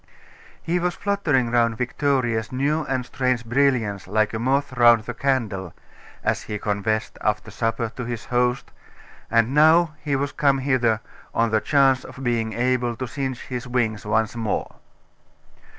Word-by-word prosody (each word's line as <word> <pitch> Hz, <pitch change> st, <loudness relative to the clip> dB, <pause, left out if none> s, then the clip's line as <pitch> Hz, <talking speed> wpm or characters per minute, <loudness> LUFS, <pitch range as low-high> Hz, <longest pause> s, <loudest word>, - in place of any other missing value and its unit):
He 175 Hz, +2 st, 0 dB
was 175 Hz, 0 st, -1 dB
fluttering 155 Hz, -12 st, 0 dB
round 115 Hz, -2 st, +2 dB
Victoria's 125 Hz, -3 st, 0 dB
new 145 Hz, +5 st, 0 dB
and 130 Hz, -3 st, -2 dB
strange 125 Hz, -2 st, -1 dB
brilliance 120 Hz, -6 st, +1 dB
like 110 Hz, +2 st, +1 dB
a 110 Hz, -, -2 dB
moth 135 Hz, +3 st, 0 dB
round 120 Hz, -2 st, +5 dB
the 120 Hz, -, -5 dB
candle, 110 Hz, -9 st, -1 dB, 0.5 s
as -, -, 0 dB
he 105 Hz, -, -5 dB
confessed, 105 Hz, +1 st, -2 dB
after 105 Hz, 0 st, -1 dB
supper, 115 Hz, 0 st, -1 dB
to 125 Hz, -, -5 dB
his 120 Hz, -2 st, -5 dB
host; 125 Hz, 0 st, 0 dB, 0.6 s
and 115 Hz, +2 st, +2 dB
now 160 Hz, +2 st, +5 dB
he 145 Hz, -2 st, 0 dB
was 140 Hz, +1 st, -1 dB
come 140 Hz, -3 st, +2 dB
hither, 125 Hz, -5 st, +1 dB, 0.3 s
on 115 Hz, -1 st, +2 dB
the 110 Hz, -1 st, +2 dB
chance 135 Hz, -3 st, +3 dB
of 130 Hz, +1 st, -10 dB
being 115 Hz, -2 st, 0 dB
able 125 Hz, -1 st, 0 dB
to 130 Hz, -, -4 dB
singe 130 Hz, 0 st, -4 dB
his 125 Hz, 0 st, -6 dB
wings 115 Hz, -4 st, -1 dB
once 110 Hz, +2 st, 0 dB
more. 115 Hz, -3 st, -3 dB
125 Hz, 155 wpm, -23 LUFS, 115-135 Hz, 0.6 s, round